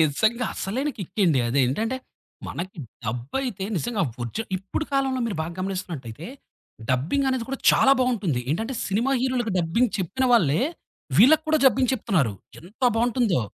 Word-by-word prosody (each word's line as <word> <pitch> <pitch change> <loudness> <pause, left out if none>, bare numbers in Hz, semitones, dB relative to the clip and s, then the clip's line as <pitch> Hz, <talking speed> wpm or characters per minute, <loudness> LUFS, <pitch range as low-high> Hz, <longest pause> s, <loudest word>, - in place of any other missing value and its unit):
నిజంగా. 220 - +1
అసలైన 255 +10 -2
కిక్ 185 -1 -7
అండి 150 -7 +3
అది 130 - +1
ఏంటంటే, 225 - -1 0.5
మనకి 180 +1 -6 0.3
డబ్ 120 +4 -4
అయితే 215 -8 -3
నిజంగా 215 +4 -1 0.2
ఒరిజినల్ 215 - -4
ఇప్పుడు 195 +11 -4
కాలంలో 270 -1 +1
మీరు 205 -7 -3
బాగా 165 - -5
గమనిస్తున్నట్లయితే, 170 -9 -5 0.6
డబ్బింగనేది 245 - +1
కూడా 270 - -3
చాలా 270 - +5
బావుంటుంది. 210 - 0
ఏంటంటే 225 - -2
సినిమా 230 +7 +1
హీరోలకి 250 -4 0
డబ్బింగ్ 185 +8 +1
చెప్పిన 195 +9 -1
వాళ్ళే, 165 - +4 0.6
వీళ్ళకి 310 +5 +7
కూడా 315 - +4
డబ్బింగ్ 260 -1 +3
చెప్తున్నారు 180 - 0 0.3
ఎంత 195 - -17
బావుంటుందో! 235 - +2
215 Hz, 140 wpm, -24 LUFS, 165-255 Hz, 0.6 s, వీళ్ళకి